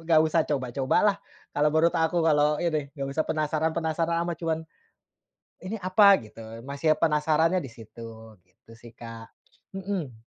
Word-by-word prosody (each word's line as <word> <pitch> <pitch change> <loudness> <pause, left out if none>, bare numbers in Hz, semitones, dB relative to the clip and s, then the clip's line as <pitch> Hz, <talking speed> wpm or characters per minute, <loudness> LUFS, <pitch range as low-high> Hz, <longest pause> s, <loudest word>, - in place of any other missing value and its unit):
nggak 160 -2 +6
usah 160 +1 +2
coba-cobalah, 135 - +1 0.4
kalau 150 +1 +3
menurut 165 +2 +4
aku, 165 +1 +1
kalau 150 -1 +3
ini. 155 -4 -1
Nggak 135 -1 -3
usah 155 +2 0
penasaran-penasaran 160 +2 -1
amat, 170 -1 -3
cuman, 160 -1 0 1.0
"Ini 190 +4 -4
apa?" 195 +2 +6
Gitu. 110 +1 -14 0.3
Masih 155 +3 +1
penasarannya 160 +3 +2
di 135 - -6
situ. 115 -1 -12
Gitu 95 +5 -21
sih, 120 -1 -14
Kak. 115 -1 -10 0.5
Mhm. 175 - -5
155 Hz, 140 wpm, -26 LUFS, 130-165 Hz, 1.0 s, nggak